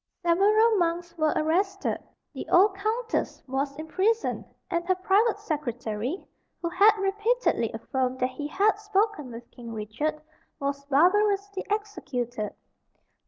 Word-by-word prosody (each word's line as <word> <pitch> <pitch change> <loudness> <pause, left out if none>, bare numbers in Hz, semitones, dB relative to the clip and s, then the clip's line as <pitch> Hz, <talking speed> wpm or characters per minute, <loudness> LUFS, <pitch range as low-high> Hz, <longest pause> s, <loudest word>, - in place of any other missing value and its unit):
Several 420 +6 +4
monks 340 0 -1
were 310 -2 +2
arrested; 350 +6 0 0.3
the - - -7
old 385 +3 +5
Countess 445 +4 -2
was 275 +2 -2
imprisoned; 380 +9 0 0.3
and 340 0 0
her 370 - +3
private 410 +4 +2
secretary, 260 - -3 0.3
who 340 - -2
had 405 +5 +5
repeatedly 420 +5 +1
affirmed 260 -1 -2
that 255 +1 0
he 290 +3 -5
had 410 +6 +2
spoken 415 - 0
with 235 +1 -10
King 235 -2 -9
Richard, 255 +9 -3 0.4
was 280 0 -2
barbarously 395 +6 +2
executed. 255 - -3
350 Hz, 120 wpm, -27 LUFS, 280-415 Hz, 0.4 s, old